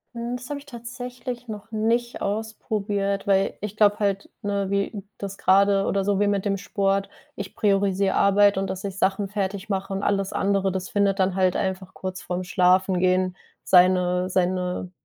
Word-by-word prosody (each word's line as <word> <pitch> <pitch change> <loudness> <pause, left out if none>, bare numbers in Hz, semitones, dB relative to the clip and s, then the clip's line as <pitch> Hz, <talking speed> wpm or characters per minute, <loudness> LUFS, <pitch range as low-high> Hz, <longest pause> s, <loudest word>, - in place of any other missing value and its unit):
Mhm. 235 +1 -3
Das 250 +1 -11
habe 290 - -3
ich 285 - -16
tatsächlich 245 -1 -7
noch 215 0 -8
nicht 230 +2 0
ausprobiert, 205 -1 -2
weil 195 -1 +2
ich 210 0 -5
glaube 205 0 +4
halt, 200 -1 -1
ne, 200 -1 -1
wie 200 +1 -1
das 195 -1 -6
gerade 195 +1 +4
oder 195 0 0
so 200 0 +1
wie 205 - +3
mit 200 -1 0
dem 200 -1 +1
Sport, 195 0 0 0.3
ich 200 -1 -7
priorisiere 195 -1 +2
Arbeit 200 0 +4
und 195 0 -1
dass 190 0 -5
ich 195 -2 -5
Sachen 195 +1 +1
fertig 195 0 -3
mache 195 -1 -2
und 195 - -3
alles 195 -1 0
andere, 195 -1 +1
das 190 0 -4
findet 200 -1 +1
dann 185 -1 +2
halt 185 -2 +2
einfach 190 0 -3
kurz 185 0 -6
vorm 180 +1 -3
Schlafengehen, 185 0 +2 0.3
seine 180 0 +4
seine 180 0 -1
195 Hz, 175 wpm, -24 LUFS, 190-205 Hz, 0.3 s, glaube